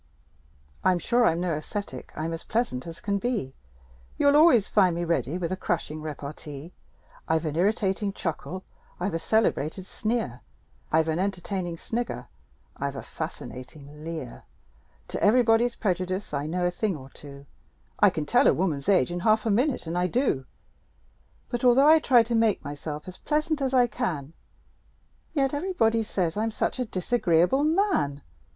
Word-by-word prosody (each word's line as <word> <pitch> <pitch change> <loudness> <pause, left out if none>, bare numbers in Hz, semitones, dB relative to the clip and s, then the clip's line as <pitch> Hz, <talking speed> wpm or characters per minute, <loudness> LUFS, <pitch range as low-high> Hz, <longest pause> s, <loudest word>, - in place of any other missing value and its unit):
I'm 185 -1 +4
sure 240 +6 +3
I'm 165 +1 +1
no 180 -2 0
ascetic: 155 - -5
I'm 160 +1 -3
as 165 - -6
pleasant 220 - -1
as 165 0 -8
can 200 -1 -1
be; 205 - -2 0.6
You'll 285 0 +4
always 295 - +6
find 185 -5 +3
me 170 - -2
ready 160 -1 0
with 175 -1 -3
a - - 0
crushing 165 -4 -3
repartee; 150 +1 -7 0.5
I've 160 0 +1
an 155 -1 -2
irritating 200 +2 +1
chuckle; 185 +1 -4 0.4
I've 185 +1 -1
a 165 - -1
celebrated 190 -4 0
sneer; 220 - -2 0.5
I've 160 0 +3
an 160 +1 0
entertaining 185 -2 -2
snigger; 235 +7 -4 0.5
I've - - -3
a - - -6
fascinating 145 +3 -8
leer; 160 -7 -6 0.6
To - - -4
everybody's 235 +1 +4
prejudice 185 -2 -2
I 145 +1 -1
know 180 +2 -1
a 175 - +2
thing 195 -1 -1
or 135 -1 -12
two; 140 -1 -12 0.5
I - - +7
can 155 - -3
tell - - +4
a - - +5
woman's 155 -5 -1
age 180 -7 +4
in 175 - -2
half 215 +4 +3
a 220 - +2
minute 250 +4 +1
and 165 +1 -4
I 180 0 +2
do 180 - 0 1.0
But 240 0 -3
although 255 +3 +6
I 320 +1 +8
try 245 -6 +5
to 235 +1 -4
make 225 -2 +2
myself 150 +2 -6
as 185 - -9
pleasant 305 0 0
as 265 -1 0
I 255 -2 +5
can, 175 - -3 1.0
Yet 270 -2 +2
everybody 290 -9 +1
says 185 -5 -1
I'm 220 +1 +1
such 225 - -2
a 250 - 0
disagreeable 195 - +2
man! 310 - +1
185 Hz, 165 wpm, -26 LUFS, 160-230 Hz, 1.0 s, I